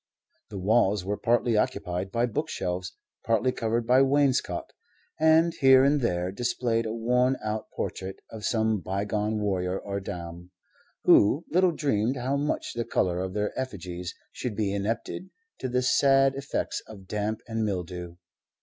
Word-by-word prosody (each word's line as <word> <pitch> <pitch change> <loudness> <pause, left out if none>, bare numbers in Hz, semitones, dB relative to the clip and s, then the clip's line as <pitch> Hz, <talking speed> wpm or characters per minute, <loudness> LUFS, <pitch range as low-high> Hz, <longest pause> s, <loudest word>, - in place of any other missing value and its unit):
The 105 - -7
walls 100 -1 +2
were 100 +2 -1
partly 120 +1 +1
occupied 95 -3 -1
by 115 +2 +1
bookshelves, 90 -5 -3 0.3
partly 115 +3 +2
covered 115 -1 -1
by 125 +3 +5
wainscot, 135 -1 +1 0.5
and 160 +1 +5
here 130 -1 +7
and 140 +1 +3
there 90 -5 0
displayed 115 +1 -1
a - - -3
worn 125 +3 +2
out 110 0 -3
portrait 95 0 -4
of 110 -2 -8
some 110 -2 +1
bygone 105 +4 -1
warrior 95 -2 -1
or 100 0 -4
dame, 85 -2 -7 0.5
who 135 +11 +5
little 185 +2 +4
dreamed 130 -5 0
how 130 +3 -1
much 145 +2 -2
the 120 - -2
color 90 -5 0
of 95 +1 -4
their 105 0 -1
effigies 90 -8 -5 0.2
should 120 -5 -4
be 100 -2 0
indebted 115 - -3 0.3
to 130 - -3
the 125 +1 +1
sad 135 +1 +4
effects 140 0 -3
of 100 -3 -11
damp 105 +2 -2
and 110 -1 -2
mildew. 90 -3 -4
110 Hz, 150 wpm, -27 LUFS, 95-125 Hz, 0.5 s, here